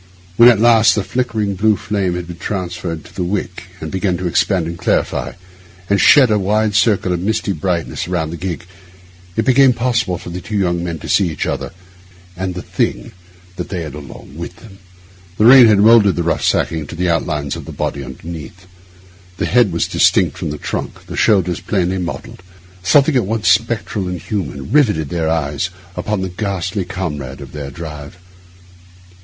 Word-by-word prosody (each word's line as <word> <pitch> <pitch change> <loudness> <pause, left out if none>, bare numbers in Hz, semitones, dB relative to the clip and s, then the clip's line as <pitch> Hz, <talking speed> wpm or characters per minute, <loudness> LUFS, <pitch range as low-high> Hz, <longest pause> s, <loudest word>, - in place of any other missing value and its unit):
When 115 +4 +8
at 115 -4 +4
last 115 -1 +5
the 105 - 0
flickering 110 -1 -1
blue 105 +3 +2
flame 95 -4 -2
had 90 -1 -4
been 85 0 -9
transferred 90 -4 -4
to - - -15
the 90 - -3
wick 90 -1 -3
and 80 - -6
began 95 -1 0
to 90 - -5
expand 90 0 +1
and 85 +1 -4
clarify, - - -1 0.6
and 100 - +3
shed 135 -6 +6
a 105 - +3
wide 105 +2 +1
circle 100 -3 +2
of 90 - -2
misty 105 +2 -1
brightness 90 -1 -2
round 85 -3 -2
the - - -5
gig, 90 -1 -5 0.7
it - - 0
became 130 0 +5
possible 120 -6 0
for 85 - -9
the 90 +1 -5
two 105 +4 -4
young 85 -3 0
men 85 -2 -3
to - - -9
see 95 -4 +2
each 80 - -3
other - - -3 0.7
and 95 0 -4
the 90 - -5
thing - - -2 0.5
they 90 -4 -4
had 75 -3 -7
along 70 -2 -11
with 85 +2 -7
them. 95 +2 -15 0.6
The 105 - +3
rain 125 0 +9
had 105 -2 +5
moulded 105 -2 +6
the 85 - -1
rough 85 - -1
sacking 80 -3 0
to - - -8
the 90 +2 -1
outlines 75 -3 -1
of - - -8
the - - -8
body 70 - -3
underneath; 80 +6 -9 0.7
the - - -1
head 120 -4 +3
was 85 - 0
distinct - - +3
from - - -4
the 75 - -4
trunk, - - -5
the - - -7
shoulders 90 -5 +2
plainly 95 -1 -1
modelled; 90 0 -6 0.4
something 140 - +4
at 120 -7 +2
once 110 0 -1
spectral 110 -3 0
and 90 -1 -4
human 70 - -5
riveted 105 - +2
their 80 -2 -1
eyes 80 +1 -1 0.3
upon 100 +2 -2
the 95 - -3
ghastly 95 0 -3
comrade 75 -8 -5
of - - -10
their 70 -2 -6
drive. 75 +1 -8
90 Hz, 185 wpm, -17 LUFS, 85-105 Hz, 0.7 s, rain